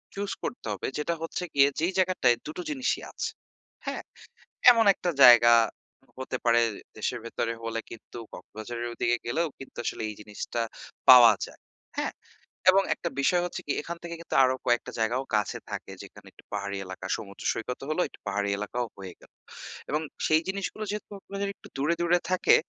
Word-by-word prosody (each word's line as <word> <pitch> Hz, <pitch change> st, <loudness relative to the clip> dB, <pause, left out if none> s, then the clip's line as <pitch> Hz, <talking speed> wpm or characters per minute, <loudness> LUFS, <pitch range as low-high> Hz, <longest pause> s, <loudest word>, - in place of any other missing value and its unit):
Choose 200 Hz, 0 st, -3 dB
করতে -, -, -5 dB
হবে 100 Hz, -, -4 dB
যেটা 150 Hz, +3 st, 0 dB
হচ্ছে 165 Hz, +2 st, -3 dB
গিয়ে 140 Hz, 0 st, +6 dB
যেই 175 Hz, +4 st, +1 dB
জায়গাটায় 180 Hz, -10 st, +3 dB
২ -, -, -4 dB
টো 360 Hz, -, -2 dB
জিনিসই 265 Hz, -3 st, -1 dB
আছে। -, -, -3 dB, 0.6 s
হ্যাঁ? -, -, -3 dB, 0.7 s
এমন 230 Hz, -2 st, +4 dB
একটা 180 Hz, -, -2 dB
জায়গা 120 Hz, -1 st, +9 dB, 0.7 s
হতে 130 Hz, 0 st, -3 dB
পারে 120 Hz, 0 st, +5 dB, 0.4 s
দেশের -, -, -2 dB
ভেতরে 115 Hz, 0 st, -2 dB
হলে 115 Hz, 0 st, -2 dB
কিন্তু 115 Hz, -, -10 dB, 0.2 s
কক্সবাজারের 115 Hz, +2 st, -7 dB
ওই 120 Hz, -, -10 dB
দিকে 120 Hz, 0 st, +3 dB
গেলেও 160 Hz, +8 st, 0 dB
কিন্তু 135 Hz, -, -11 dB
আসলে -, -, -2 dB
এই 105 Hz, -, -7 dB
জিনিসটা 105 Hz, +2 st, -4 dB, 0.5 s
পাওয়া 120 Hz, -3 st, +11 dB
যায় -, -, -16 dB, 0.4 s
হ্যাঁ? -, -, -1 dB, 0.6 s
এবং 195 Hz, +1 st, +4 dB
একটা 170 Hz, -, -4 dB
বিষয় 175 Hz, +5 st, +3 dB
হচ্ছে 175 Hz, -, -5 dB
কি -, -, 0 dB
এখান 170 Hz, +2 st, -6 dB
থেকে 170 Hz, 0 st, -5 dB
কিন্তু -, -, -5 dB
আরো 130 Hz, 0 st, +3 dB
কয়েকটা 120 Hz, -1 st, +1 dB
জায়গাও 120 Hz, +4 st, +1 dB
কাছে 105 Hz, -1 st, 0 dB
থাকে -, -, -5 dB
যেখানে -, -, -14 dB
একটু -, -, -19 dB
পাহাড়ি 100 Hz, -1 st, -3 dB
এলাকা 95 Hz, 0 st, -7 dB
সমুদ্র 100 Hz, -1 st, -10 dB
সৈকতও 125 Hz, +4 st, -5 dB
হলো 155 Hz, -, +1 dB
একটু -, -, -17 dB
পাহাড়ি 100 Hz, 0 st, 0 dB
এলাকাও 120 Hz, +4 st, -2 dB
হয়ে 95 Hz, -2 st, -8 dB
গেল। -, -, -19 dB, 0.6 s
এবং 150 Hz, +1 st, 0 dB, 0.3 s
সেই 155 Hz, 0 st, +4 dB
জিনিসগুলো 200 Hz, +2 st, -3 dB
যেহেতু 210 Hz, 0 st, -6 dB
আপনাদের 200 Hz, +1 st, -4 dB
একটু -, -, -15 dB
দূরে, 150 Hz, +5 st, +2 dB
দূরে 175 Hz, +1 st, +3 dB
থাকে 185 Hz, -, +5 dB
130 Hz, 175 wpm, -27 LUFS, 115-175 Hz, 0.7 s, পাওয়া